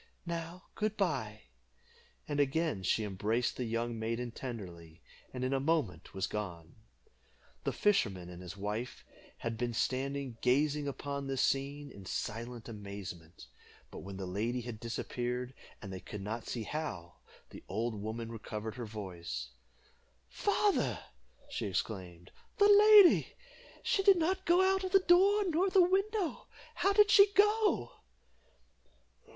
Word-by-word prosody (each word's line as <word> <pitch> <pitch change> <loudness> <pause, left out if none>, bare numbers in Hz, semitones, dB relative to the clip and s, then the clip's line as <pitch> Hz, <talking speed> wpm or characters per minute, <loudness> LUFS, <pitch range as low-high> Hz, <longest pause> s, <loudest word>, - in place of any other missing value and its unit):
Now, 170 +1 -5
good 215 0 -2
bye;" 125 - -1 0.8
and 145 -1 -2
again 145 - +1
she 95 +4 +1
embraced 105 +4 -1
the 125 - -3
young 115 0 -2
maiden 115 +2 -2
tenderly, 90 -10 -8 0.3
and 125 -1 -5
in 130 +1 0
a 135 - +2
moment 135 - -1
was 95 - 0
gone. 85 -6 -6 0.9
The - - +1
fisherman 100 - +1
and 90 0 -9
his 90 +2 -8
wife 105 +5 -4 0.3
had 115 -1 -4
been 120 -1 -2
standing 135 -1 -2
gazing 145 +3 +2
upon 140 0 -4
this 135 -1 0
scene 140 +1 -1
in 100 -4 -11
silent 115 +3 -4
amazement; 100 - -8 0.5
but - - -8
when 95 0 -8
the 95 - -4
lady 110 +7 -2
had 120 -2 -7
disappeared, 125 +2 -3 0.3
and 95 -2 -7
they 95 - -5
could 105 +2 -8
not 110 +3 -5
see 115 - -3
how, 105 - -5 0.3
the - - -11
old 115 +1 -1
woman 110 +2 -5
recovered 110 0 -6
her 120 -2 -5
voice 85 - -6 0.8
"Father," - - +1 0.5
she - - -3
exclaimed, 90 -3 -4 0.3
"the 405 - +5
lady! 415 -2 +7 0.5
she 390 - +2
did 390 -1 +6
not 375 +3 0
go 350 +2 +5
out 385 0 +2
at 375 - -4
the 390 - +8
door, 395 +4 +6
nor 360 +2 +2
the 380 - +4
window; 390 0 0 0.3
how 395 - +2
did 415 0 +5
she 400 0 +7
go?" 420 +2 +3
120 Hz, 145 wpm, -32 LUFS, 105-165 Hz, 0.9 s, the